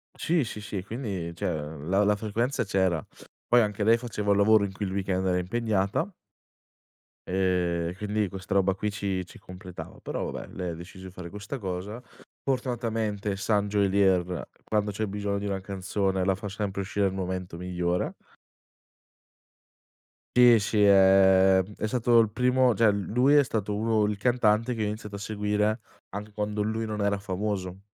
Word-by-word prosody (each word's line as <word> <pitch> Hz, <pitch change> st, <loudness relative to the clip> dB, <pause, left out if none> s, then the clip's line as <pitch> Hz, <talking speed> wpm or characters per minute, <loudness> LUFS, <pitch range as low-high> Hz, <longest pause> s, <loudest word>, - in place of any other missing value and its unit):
Sì, 165 Hz, -3 st, +1 dB
sì, 105 Hz, -2 st, -6 dB
sì, 100 Hz, -2 st, -5 dB
quindi 100 Hz, -6 st, -4 dB
cioè, 100 Hz, -, -4 dB
ehm, 75 Hz, -2 st, -4 dB
la 100 Hz, +2 st, +3 dB
la 105 Hz, 0 st, +3 dB
frequenza 115 Hz, +6 st, -1 dB
c'era. 95 Hz, -5 st, 0 dB, 0.4 s
Poi 120 Hz, 0 st, +5 dB
anche 105 Hz, -1 st, -1 dB
lei 115 Hz, +2 st, +5 dB
faceva 105 Hz, -4 st, -2 dB
il 100 Hz, -, +4 dB
lavoro 105 Hz, 0 st, +5 dB
in 100 Hz, -, -5 dB
cui 100 Hz, +2 st, -4 dB
il 95 Hz, -, -3 dB
weekend 95 Hz, -1 st, -1 dB
era 90 Hz, -1 st, +2 dB
impegnata 105 Hz, -, 0 dB, 1.2 s
ehm, 90 Hz, -2 st, +1 dB
e 90 Hz, -, -7 dB
quindi 105 Hz, 0 st, -1 dB
questa 95 Hz, 0 st, -6 dB
roba 95 Hz, -1 st, +3 dB
qui 105 Hz, +2 st, -2 dB
ci 100 Hz, -3 st, -2 dB
ci -, -, -14 dB
completava 90 Hz, 0 st, -10 dB
però -, -, -3 dB
vabbè -, -, -7 dB
lei 90 Hz, -1 st, -4 dB
ha 85 Hz, -, -3 dB
deciso 95 Hz, +3 st, -10 dB
di 95 Hz, -, -10 dB
fare 90 Hz, -2 st, -8 dB
questa 105 Hz, +7 st, -6 dB
cosa. 100 Hz, +3 st, -5 dB, 0.4 s
Fortunatamente 115 Hz, -6 st, -1 dB
San 105 Hz, +1 st, +1 dB
Geolier 95 Hz, -3 st, +2 dB, 0.2 s
quando 105 Hz, -1 st, 0 dB
c'è 110 Hz, +2 st, -2 dB
bisogno 100 Hz, 0 st, -2 dB
di 100 Hz, -, -4 dB
una 100 Hz, -1 st, -2 dB
canzone 95 Hz, 0 st, -1 dB
la 95 Hz, 0 st, +2 dB
fa 105 Hz, +2 st, -7 dB
sempre 100 Hz, -1 st, -3 dB
uscire 100 Hz, +1 st, -1 dB
al 95 Hz, -, -3 dB
momento 90 Hz, -2 st, -4 dB
migliore. 90 Hz, -, -1 dB, 2.2 s
Sì, 120 Hz, -2 st, +8 dB
sì, 105 Hz, +1 st, +1 dB
ehm, 95 Hz, 0 st, +5 dB
è 110 Hz, -, -1 dB
stato 120 Hz, 0 st, +3 dB
il 110 Hz, -2 st, +4 dB
primo 125 Hz, +1 st, +3 dB
cioè 110 Hz, +1 st, +4 dB
lui 115 Hz, +7 st, +2 dB
è 145 Hz, -1 st, +7 dB
stato 105 Hz, -4 st, -2 dB
uno 110 Hz, 0 st, +1 dB
il 105 Hz, -1 st, 0 dB
cantante 120 Hz, 0 st, +2 dB
che 110 Hz, -, -3 dB
io -, -, +1 dB
ho -, -, 0 dB
iniziato 105 Hz, -1 st, -6 dB
a -, -, -4 dB
seguire 105 Hz, +1 st, -1 dB, 0.3 s
anche 105 Hz, +2 st, -7 dB
quando 105 Hz, 0 st, -2 dB
lui 110 Hz, +2 st, -1 dB
non 105 Hz, -1 st, -3 dB
era 100 Hz, 0 st, +1 dB
famoso. 95 Hz, -1 st, -3 dB
100 Hz, 175 wpm, -27 LUFS, 95-110 Hz, 2.2 s, Sì